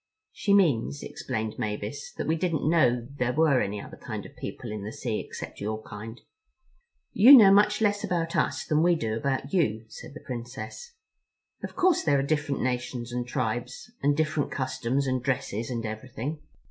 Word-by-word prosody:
"She 200 Hz, -1 st, +2 dB
means," 120 Hz, -, +2 dB
explained 110 Hz, +1 st, -4 dB
Mavis, 110 Hz, +4 st, -4 dB
"that -, -, -4 dB
we 160 Hz, -, +1 dB
didn't 165 Hz, -2 st, -1 dB
know 125 Hz, -8 st, +3 dB
there 125 Hz, 0 st, +1 dB
were 150 Hz, -4 st, +4 dB
any 100 Hz, +1 st, -2 dB
other -, -, -10 dB
kind -, -, -6 dB
of -, -, -13 dB
people 120 Hz, -, -6 dB
in 105 Hz, -2 st, -5 dB
the 105 Hz, -, -5 dB
sea 115 Hz, -2 st, -3 dB
except -, -, -8 dB
your 110 Hz, +1 st, -2 dB
kind." 110 Hz, +2 st, -9 dB, 0.9 s
"You 255 Hz, +7 st, +10 dB
know 205 Hz, -5 st, +8 dB
much 210 Hz, +2 st, +4 dB
less 205 Hz, -1 st, +2 dB
about 170 Hz, -4 st, -1 dB
us -, -, 0 dB
than 155 Hz, -1 st, +2 dB
we 175 Hz, +1 st, +4 dB
do 110 Hz, -8 st, -2 dB
about 135 Hz, +5 st, -2 dB
you," 110 Hz, -, +1 dB
said -, -, -11 dB
the -, -, -10 dB
Princess. 120 Hz, -, -7 dB, 0.7 s
"Of -, -, -7 dB
course 370 Hz, -3 st, +3 dB
there 145 Hz, -3 st, +3 dB
are 135 Hz, -, +1 dB
different 150 Hz, -1 st, -1 dB
nations 125 Hz, -1 st, -2 dB
and 120 Hz, 0 st, -3 dB
tribes, 125 Hz, -, -3 dB
and 145 Hz, +1 st, +2 dB
different 155 Hz, -2 st, 0 dB
customs 130 Hz, 0 st, -1 dB
and 130 Hz, -1 st, 0 dB
dresses 120 Hz, -3 st, -2 dB
and 115 Hz, -2 st, -3 dB
everything. 125 Hz, +7 st, -5 dB
130 Hz, 180 wpm, -27 LUFS, 115-160 Hz, 0.9 s, You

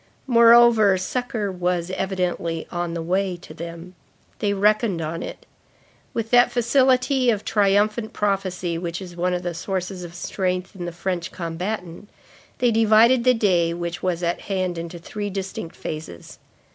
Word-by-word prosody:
Moreover, 235 Hz, -4 st, +6 dB
succor 215 Hz, +1 st, -2 dB
was, 180 Hz, -1 st, -1 dB
evidently, 180 Hz, -4 st, -2 dB
on 175 Hz, -1 st, -3 dB
the 165 Hz, -, -3 dB
way 185 Hz, +1 st, 0 dB
to 170 Hz, -2 st, -12 dB
them. 170 Hz, +2 st, -8 dB, 0.5 s
They 205 Hz, -, +1 dB
reckoned 205 Hz, -1 st, +2 dB
on 165 Hz, +1 st, -4 dB
it. -, -, -8 dB, 0.7 s
With 225 Hz, -1 st, -3 dB
that 245 Hz, 0 st, +6 dB
facility 255 Hz, +1 st, +3 dB
of 215 Hz, -3 st, 0 dB
triumphant 210 Hz, +2 st, +2 dB
prophecy 185 Hz, -4 st, -1 dB
which 170 Hz, 0 st, -4 dB
is 180 Hz, -3 st, -9 dB
one 180 Hz, +1 st, 0 dB
of 180 Hz, -, -4 dB
the 175 Hz, -1 st, -3 dB
sources 185 Hz, +1 st, -4 dB
of 175 Hz, 0 st, -9 dB
strength 185 Hz, +2 st, -3 dB
in 180 Hz, -2 st, -6 dB
the 175 Hz, -, -4 dB
French 175 Hz, 0 st, -3 dB
combatant, 180 Hz, +2 st, -5 dB, 0.5 s
they 245 Hz, -1 st, +2 dB
divided 225 Hz, +2 st, +5 dB
the 255 Hz, 0 st, +5 dB
day 175 Hz, -6 st, +2 dB
which 170 Hz, 0 st, -4 dB
was 180 Hz, -1 st, -1 dB
at 170 Hz, 0 st, -1 dB
hand 185 Hz, -3 st, -2 dB
into 170 Hz, +1 st, -6 dB
three 205 Hz, +4 st, -5 dB
distinct 190 Hz, -3 st, -5 dB
phases. 155 Hz, -, -8 dB
185 Hz, 155 wpm, -23 LUFS, 175-215 Hz, 0.7 s, Moreover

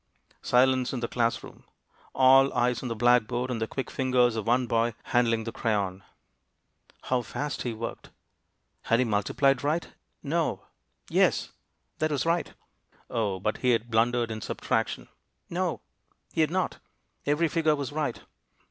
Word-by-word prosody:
Silence 130 Hz, +1 st, +3 dB
in 130 Hz, -, -2 dB
the 120 Hz, -, -2 dB
class 115 Hz, -1 st, 0 dB
room. -, -, -13 dB, 0.5 s
All 135 Hz, +1 st, +6 dB
eyes 120 Hz, 0 st, +1 dB
on 125 Hz, -, -4 dB
the 115 Hz, -, -2 dB
blackboard, 120 Hz, +2 st, +2 dB
and 115 Hz, -2 st, -3 dB
the 110 Hz, -, 0 dB
quick 135 Hz, -, -5 dB
fingers 125 Hz, -3 st, +2 dB
of 110 Hz, -1 st, -3 dB
one 125 Hz, +2 st, +3 dB
boy 115 Hz, -1 st, 0 dB
handling 115 Hz, -2 st, +1 dB
the 115 Hz, -, -5 dB
crayon. 100 Hz, -5 st, -1 dB, 1.0 s
How 130 Hz, -1 st, 0 dB
fast 145 Hz, +5 st, -4 dB
he 120 Hz, -, -2 dB
worked! 115 Hz, +1 st, -6 dB, 0.8 s
Had 115 Hz, -, +3 dB
be 130 Hz, -, +3 dB
multiplied 120 Hz, +5 st, +1 dB
right? 155 Hz, +4 st, 0 dB, 0.3 s
No. 160 Hz, +2 st, -1 dB, 0.4 s
Yes, -, -, +2 dB, 0.5 s
that 155 Hz, -, +1 dB
was 145 Hz, -1 st, -1 dB
right. 170 Hz, +1 st, 0 dB, 0.6 s
O, 105 Hz, -6 st, -1 dB
but 105 Hz, +3 st, -1 dB
he 125 Hz, -, 0 dB
had 115 Hz, +1 st, -1 dB
blundered 115 Hz, +1 st, +2 dB
in 110 Hz, 0 st, -5 dB
subtraction! -, -, -2 dB, 0.4 s
No, -, -, -1 dB, 0.5 s
he 160 Hz, -, +1 dB
had 155 Hz, -, +3 dB
not; 185 Hz, +2 st, -1 dB, 0.5 s
every 150 Hz, +3 st, +2 dB
figure 160 Hz, -1 st, +2 dB
was 140 Hz, -2 st, -4 dB
right. 145 Hz, -5 st, -2 dB
125 Hz, 155 wpm, -27 LUFS, 115-140 Hz, 1.0 s, All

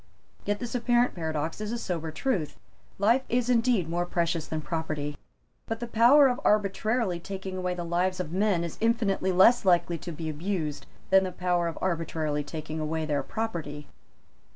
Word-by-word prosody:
Yet 205 Hz, 0 st, 0 dB
this 240 Hz, -1 st, -5 dB
apparent 240 Hz, 0 st, +2 dB
paradox 160 Hz, +1 st, -3 dB
is 215 Hz, 0 st, -3 dB
a 240 Hz, -, -2 dB
sober 170 Hz, -7 st, -3 dB
truth. 170 Hz, -, -2 dB, 0.4 s
Life 230 Hz, +6 st, +3 dB
is 245 Hz, +1 st, +1 dB
indeed 230 Hz, -7 st, +2 dB
more 175 Hz, +1 st, -1 dB
precious 170 Hz, -2 st, -1 dB
than 160 Hz, -, -3 dB
property. 150 Hz, -2 st, -3 dB, 0.5 s
But 225 Hz, 0 st, -3 dB
the 240 Hz, -, -3 dB
power 240 Hz, +5 st, +6 dB
of 250 Hz, -1 st, -1 dB
arbitrarily 210 Hz, -1 st, +1 dB
taking 190 Hz, +1 st, -6 dB
away 180 Hz, -1 st, -2 dB
the 175 Hz, -, -4 dB
lives 180 Hz, +2 st, 0 dB
of 170 Hz, -4 st, -4 dB
men 190 Hz, -2 st, +1 dB
is 170 Hz, -, -6 dB
infinitely 220 Hz, -5 st, +1 dB
less 195 Hz, +7 st, +6 dB
likely 175 Hz, -2 st, +2 dB
to 175 Hz, -, -6 dB
be 160 Hz, 0 st, -5 dB
abused 155 Hz, -1 st, -3 dB, 0.2 s
than 190 Hz, 0 st, +6 dB
the 185 Hz, -, -3 dB
power 175 Hz, -1 st, 0 dB
of 165 Hz, -, -4 dB
arbitrarily 160 Hz, -4 st, -1 dB
taking 155 Hz, +1 st, -6 dB
away 155 Hz, +1 st, -2 dB
their 145 Hz, -2 st, 0 dB
property. 155 Hz, -7 st, -4 dB
180 Hz, 175 wpm, -27 LUFS, 160-220 Hz, 0.5 s, power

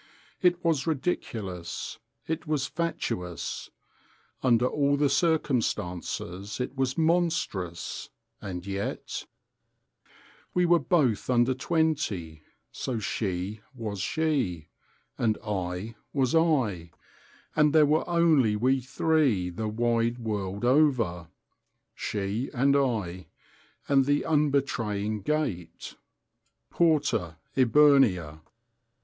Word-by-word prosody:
It 175 Hz, -1 st, +2 dB
was 160 Hz, -4 st, +1 dB
ridiculous, 105 Hz, -, -3 dB, 0.3 s
it 160 Hz, +1 st, -3 dB
was 150 Hz, -3 st, 0 dB
fatuous, 90 Hz, -, -3 dB, 0.7 s
under 120 Hz, -2 st, +3 dB
all 140 Hz, +2 st, +2 dB
the 145 Hz, 0 st, +3 dB
circumstances 105 Hz, -, -1 dB
it 125 Hz, +2 st, -3 dB
was 130 Hz, -1 st, -1 dB
monstrous, 160 Hz, -, -1 dB, 0.3 s
and 90 Hz, -2 st, -6 dB
yet{...}! 100 Hz, +1 st, -4 dB, 1.3 s
We 180 Hz, 0 st, +4 dB
were 175 Hz, 0 st, +5 dB
both 135 Hz, -, +1 dB
under 125 Hz, +1 st, +3 dB
twenty, 125 Hz, -, -1 dB, 0.3 s
so 125 Hz, -3 st, -3 dB
She 100 Hz, -1 st, -3 dB
was 110 Hz, -5 st, -5 dB
She, 115 Hz, -, -1 dB, 0.5 s
and 110 Hz, -3 st, +2 dB
I 95 Hz, +1 st, -3 dB, 0.2 s
was 130 Hz, -3 st, +1 dB
I, 130 Hz, -, +2 dB, 0.7 s
and 150 Hz, -1 st, +4 dB
there 155 Hz, 0 st, +6 dB
were 155 Hz, +4 st, +1 dB
only 160 Hz, -10 st, +4 dB
we 130 Hz, +5 st, +2 dB
three 130 Hz, -, +1 dB
the 110 Hz, +5 st, -3 dB
wide 115 Hz, +1 st, +1 dB
world 105 Hz, -2 st, -3 dB
over, 120 Hz, -, +2 dB, 0.7 s
she 105 Hz, +5 st, -3 dB
and 140 Hz, +3 st, +3 dB
I 105 Hz, -10 st, -1 dB, 0.6 s
and 135 Hz, -1 st, +4 dB
the 145 Hz, +1 st, +2 dB
unbetraying 120 Hz, -9 st, 0 dB
gate. 105 Hz, -, -2 dB, 0.8 s
_Porta 140 Hz, -, +2 dB, 0.2 s
eburnea! 125 Hz, -, +4 dB
120 Hz, 95 wpm, -27 LUFS, 100-150 Hz, 1.3 s, there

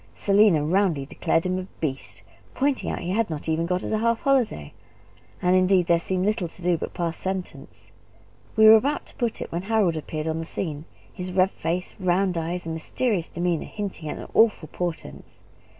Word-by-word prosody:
Selina 200 Hz, -7 st, +4 dB
roundly 170 Hz, -4 st, +1 dB
declared 165 Hz, +4 st, 0 dB
him 185 Hz, 0 st, 0 dB
a 185 Hz, -, -6 dB
beast, 135 Hz, -4 st, -4 dB, 0.3 s
pointing 275 Hz, 0 st, 0 dB
out -, -, -1 dB
that -, -, -6 dB
he 175 Hz, -, -2 dB
had 220 Hz, +1 st, +1 dB
not 155 Hz, -1 st, -5 dB
even 160 Hz, +1 st, 0 dB
got 180 Hz, +1 st, -1 dB
us -, -, -4 dB
a 215 Hz, -, +1 dB
half 230 Hz, 0 st, +1 dB
holiday; 245 Hz, -, +1 dB, 0.7 s
and, 180 Hz, +1 st, +4 dB
indeed, 185 Hz, -1 st, +4 dB
there 170 Hz, 0 st, +3 dB
seemed 185 Hz, +2 st, -1 dB
little 205 Hz, -4 st, 0 dB
to 170 Hz, +2 st, -13 dB
do 175 Hz, 0 st, +3 dB
but 160 Hz, -, -3 dB
to -, -, -16 dB
pass 170 Hz, -2 st, -2 dB
sentence. 190 Hz, -1 st, -6 dB, 0.6 s
We 220 Hz, -, +6 dB
were 220 Hz, +1 st, +10 dB
about 285 Hz, +7 st, -1 dB
to -, -, -15 dB
put 235 Hz, -3 st, -2 dB
it, -, -, -11 dB
when 170 Hz, -, -2 dB
Harold 200 Hz, -4 st, +1 dB
appeared 155 Hz, 0 st, -4 dB
on 160 Hz, 0 st, -1 dB
the 165 Hz, -, -4 dB
scene; 155 Hz, -3 st, -4 dB, 0.3 s
his 185 Hz, 0 st, -5 dB
red 185 Hz, +1 st, +3 dB
face, 175 Hz, +3 st, -3 dB
round 185 Hz, 0 st, +1 dB
eyes, 170 Hz, +2 st, -3 dB
and 165 Hz, -, -3 dB
mysterious 180 Hz, +3 st, -1 dB
demeanour, 175 Hz, -1 st, -1 dB
hinting 195 Hz, -7 st, -5 dB
at -, -, -6 dB
awful 210 Hz, -9 st, +3 dB
portents. 175 Hz, -2 st, -6 dB
180 Hz, 200 wpm, -25 LUFS, 165-205 Hz, 0.7 s, were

